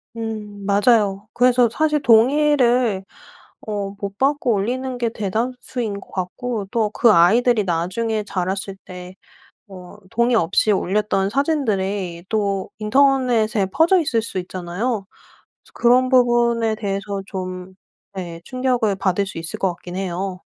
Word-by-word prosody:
음 215 Hz, -3 st, -6 dB
맞아요. 205 Hz, -1 st, +2 dB
그래서 245 Hz, 0 st, +4 dB
사실 300 Hz, +4 st, +1 dB
동의를 245 Hz, -3 st, +3 dB, 0.6 s
어 200 Hz, -1 st, -4 dB
못 200 Hz, 0 st, -6 dB
받고 275 Hz, -2 st, +1 dB
올리는 250 Hz, +5 st, -2 dB
게 235 Hz, -1 st, 0 dB
대다수인 225 Hz, +1 st, -3 dB
것 -, -, -16 dB
같고 200 Hz, +3 st, -4 dB
또 225 Hz, -3 st, +1 dB
그 230 Hz, +1 st, +4 dB
아이들이 215 Hz, +6 st, +4 dB
나중에 195 Hz, +6 st, -1 dB
자랐을 190 Hz, 0 st, -3 dB
때 180 Hz, 0 st, -10 dB, 0.5 s
어 185 Hz, -1 st, -12 dB
동의 235 Hz, +2 st, +2 dB
없이 200 Hz, +2 st, +2 dB
올렸던 195 Hz, 0 st, 0 dB
사진들이 200 Hz, -, -1 dB
또 200 Hz, -3 st, -1 dB
인터넷에 235 Hz, -3 st, +2 dB
퍼져 330 Hz, -, +3 dB
있을 235 Hz, -7 st, 0 dB
수 220 Hz, -4 st, -4 dB
있잖아요. 185 Hz, +5 st, -3 dB, 0.6 s
그래서 -, -, -22 dB
그런 250 Hz, +2 st, +3 dB
부분에 240 Hz, -3 st, +3 dB
대해서 200 Hz, -1 st, -3 dB
좀 185 Hz, -1 st, -6 dB, 0.4 s
네. 170 Hz, -3 st, -6 dB
충격을 250 Hz, -4 st, 0 dB
받을 190 Hz, +1 st, 0 dB
수 190 Hz, -, -7 dB
있을 165 Hz, 0 st, -4 dB
것 190 Hz, -, +2 dB
같긴 175 Hz, +1 st, -10 dB
해요. 185 Hz, 0 st, -4 dB
210 Hz, 270 characters per minute, -21 LUFS, 190-245 Hz, 0.6 s, 그래서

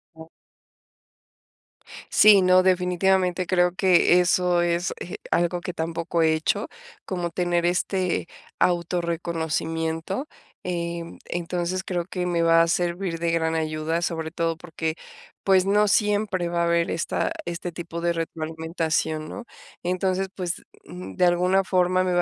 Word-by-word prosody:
Oh. 160 Hz, 0 st, -12 dB, 1.8 s
Sí, 205 Hz, -2 st, +7 dB
no, 185 Hz, 0 st, +5 dB
definitivamente, 185 Hz, 0 st, +2 dB
creo 180 Hz, -1 st, +2 dB
que 180 Hz, -1 st, +5 dB
eso 180 Hz, -1 st, +2 dB
es, 175 Hz, +2 st, 0 dB
eh, 175 Hz, -, -6 dB
algo 175 Hz, 0 st, +1 dB
que 180 Hz, -, -5 dB
tampoco 165 Hz, 0 st, -1 dB
he 160 Hz, 0 st, +4 dB
hecho, 160 Hz, 0 st, 0 dB, 0.4 s
como 175 Hz, -2 st, -3 dB
tener 175 Hz, 0 st, 0 dB
este 180 Hz, 0 st, 0 dB, 0.3 s
auto 175 Hz, 0 st, +1 dB
reconocimiento, 165 Hz, -, -2 dB, 0.4 s
em, 170 Hz, -1 st, -4 dB
entonces, 175 Hz, +2 st, -3 dB
creo 175 Hz, -2 st, -2 dB
que 180 Hz, 0 st, -4 dB
me 175 Hz, -1 st, 0 dB
va 165 Hz, 0 st, +5 dB
a -, -, 0 dB
servir 175 Hz, 0 st, -1 dB
de 170 Hz, 0 st, 0 dB
gran 160 Hz, -1 st, 0 dB
ayuda. 160 Hz, +1 st, -1 dB
Sobre 160 Hz, -2 st, -3 dB
todo, 165 Hz, -1 st, -1 dB
porque, 160 Hz, -1 st, -4 dB, 0.5 s
pues, 190 Hz, -1 st, +4 dB
no 210 Hz, +1 st, +3 dB
siempre 205 Hz, -4 st, +1 dB
va 170 Hz, 0 st, 0 dB
a -, -, +2 dB
haber 170 Hz, 0 st, +1 dB
esta 170 Hz, -, -1 dB
este 175 Hz, +1 st, -4 dB
tipo 170 Hz, 0 st, -6 dB
de 170 Hz, 0 st, +1 dB
retroalimentación, 160 Hz, -1 st, -2 dB
¿no? 245 Hz, -, -7 dB, 0.4 s
Entonces, 185 Hz, +1 st, 0 dB
pues, 180 Hz, -3 st, -4 dB, 0.2 s
mm, 90 Hz, +2 st, -9 dB
de -, -, +3 dB
alguna 180 Hz, +2 st, +3 dB
forma, 185 Hz, 0 st, +2 dB
me 185 Hz, -1 st, 0 dB
va 175 Hz, -, +3 dB
175 Hz, 145 wpm, -24 LUFS, 165-185 Hz, 1.8 s, Sí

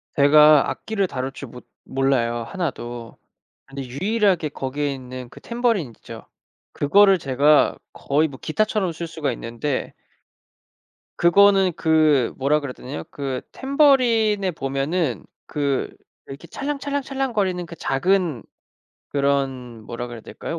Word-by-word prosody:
제가 150 Hz, 0 st, +6 dB
악기를 205 Hz, -3 st, -2 dB
다룰 130 Hz, -3 st, -4 dB
줄 135 Hz, -1 st, -9 dB
못 125 Hz, +1 st, -12 dB, 0.2 s
몰라요 125 Hz, -3 st, 0 dB
하나도. 120 Hz, -7 st, -5 dB, 0.5 s
근데 135 Hz, 0 st, -7 dB
유일하게 180 Hz, -, 0 dB
거기에 140 Hz, +1 st, -3 dB
있는 130 Hz, -1 st, -8 dB
그 -, -, -14 dB
탬버린 235 Hz, -, 0 dB
있죠. -, -, -11 dB, 0.5 s
그거를 195 Hz, +6 st, +4 dB
제가 145 Hz, +1 st, +3 dB, 0.2 s
거의 150 Hz, +3 st, 0 dB
뭐 135 Hz, -3 st, -11 dB
기타처럼 205 Hz, +1 st, 0 dB
쓸 170 Hz, +1 st, -6 dB
수가 160 Hz, -4 st, -3 dB
있는데 120 Hz, +4 st, -4 dB, 1.3 s
그거는 195 Hz, +1 st, +5 dB
그 155 Hz, -6 st, +3 dB
뭐라 145 Hz, +3 st, +2 dB
그래야 140 Hz, -3 st, -6 dB
되냐요 130 Hz, +4 st, -7 dB
그 135 Hz, -3 st, -4 dB
탬버린에 245 Hz, -8 st, +3 dB
보면은 135 Hz, -, -2 dB, 0.2 s
그 140 Hz, -2 st, -1 dB, 0.4 s
이렇게 140 Hz, +5 st, -10 dB
찰랑찰랑찰랑거리는 270 Hz, -, -2 dB
그 170 Hz, -, -10 dB
작은 165 Hz, -, 0 dB, 0.7 s
그런 135 Hz, -4 st, -1 dB
뭐라 120 Hz, +2 st, -6 dB
그래야 120 Hz, -2 st, -9 dB
될까요 165 Hz, -, -6 dB
150 Hz, 280 characters per minute, -22 LUFS, 135-195 Hz, 1.3 s, 제가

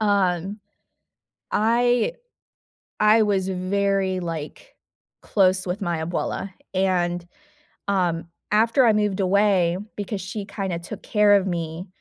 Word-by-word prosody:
um, 200 Hz, -1 st, +1 dB, 0.9 s
I 240 Hz, -, +2 dB, 0.9 s
I 215 Hz, +1 st, +6 dB
was 195 Hz, -2 st, +1 dB
very, 190 Hz, 0 st, 0 dB
like, 165 Hz, -, -6 dB, 0.5 s
close 185 Hz, -2 st, +2 dB
with 180 Hz, +4 st, -3 dB
my 170 Hz, -3 st, -1 dB
abuela, 180 Hz, +3 st, -3 dB, 0.2 s
and, 175 Hz, -2 st, 0 dB, 0.6 s
um, 175 Hz, -4 st, 0 dB, 0.3 s
after 230 Hz, +4 st, +4 dB
I 220 Hz, -, +6 dB
moved 210 Hz, -2 st, 0 dB
away 185 Hz, -2 st, +3 dB, 0.2 s
because 205 Hz, -1 st, -4 dB
she 200 Hz, +2 st, -5 dB
kinda 195 Hz, -4 st, -3 dB
took 190 Hz, +5 st, -9 dB
care 210 Hz, -1 st, +4 dB
of 195 Hz, -1 st, +1 dB
me 170 Hz, 0 st, -4 dB
195 Hz, 115 wpm, -23 LUFS, 180-210 Hz, 0.9 s, I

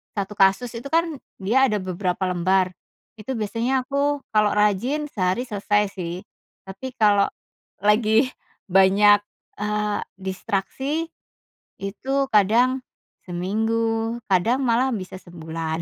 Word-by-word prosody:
satu 200 Hz, 0 st, -3 dB
kasus 195 Hz, +5 st, +3 dB
itu 240 Hz, -, -7 dB
kan, 330 Hz, -3 st, +1 dB, 0.2 s
dia 255 Hz, +8 st, +3 dB
ada 215 Hz, -4 st, 0 dB
beberapa 185 Hz, 0 st, -2 dB
lembar, 185 Hz, +1 st, +2 dB, 0.5 s
itu 215 Hz, +5 st, -4 dB
biasanya 230 Hz, +5 st, 0 dB
aku 280 Hz, +1 st, 0 dB
kalau 210 Hz, -1 st, +4 dB
rajin, 210 Hz, +9 st, +1 dB
sehari 185 Hz, +4 st, 0 dB
selesai 205 Hz, -1 st, 0 dB
sih. 170 Hz, -3 st, -4 dB, 0.5 s
Tapi, 225 Hz, +7 st, -7 dB
kalau 205 Hz, -2 st, +4 dB, 0.6 s
lagi 220 Hz, +4 st, +3 dB, 0.4 s
banyak, 195 Hz, +2 st, +6 dB, 0.4 s
eee, 210 Hz, 0 st, -1 dB, 0.2 s
distraksi, 200 Hz, -, -2 dB, 0.7 s
itu 265 Hz, +8 st, -1 dB
kadang 235 Hz, +6 st, +4 dB, 0.5 s
seminggu, 225 Hz, +5 st, -1 dB
kadang 220 Hz, +8 st, +2 dB
malah 250 Hz, +1 st, +2 dB
bisa 185 Hz, -2 st, -6 dB
sebulan. 160 Hz, -1 st, -5 dB
210 Hz, 110 wpm, -23 LUFS, 190-250 Hz, 0.7 s, banyak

